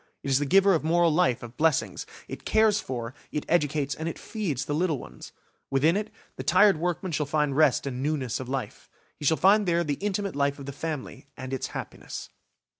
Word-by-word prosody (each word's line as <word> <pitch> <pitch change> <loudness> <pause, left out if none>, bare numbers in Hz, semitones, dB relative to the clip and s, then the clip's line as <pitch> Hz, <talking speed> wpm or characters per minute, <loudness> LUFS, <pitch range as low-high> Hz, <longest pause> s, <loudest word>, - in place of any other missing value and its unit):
It 140 - -2
is 135 - +4
the 145 - -1
giver 195 +4 +5
of 160 - +1
moral 170 0 +3
life, 155 -9 +2
of 120 0 -10
blessings; 135 - +1 0.2
it - - -8
cares 220 -1 +3
for, 120 -2 -5 0.2
it 150 - -3
educates 150 -3 +1
and 160 +1 -3
feeds 195 - -3
the 145 - -2
little 160 -1 +1
ones. - - -11 0.4
Within 150 +6 +3
it, 210 +1 -2 0.3
the - - -4
tired 190 +1 +5
workman 175 +2 -2
shall 150 -2 -1
find 150 -1 0
rest 155 -1 +3
and 130 -2 -4
newness 140 -5 -1
of 130 -1 -6
life. 130 -6 -5 0.3
He 145 - -5
shall 160 +3 +4
find 200 +2 +4
there 170 0 +2
the 145 -3 -2
intimate 200 -2 -2
life 140 0 +1
of 140 - -9
the 140 - -5
family, 150 -1 -6
and 130 +1 -6
its 130 - -2
happiness. - - -7
155 Hz, 205 wpm, -27 LUFS, 135-175 Hz, 0.4 s, giver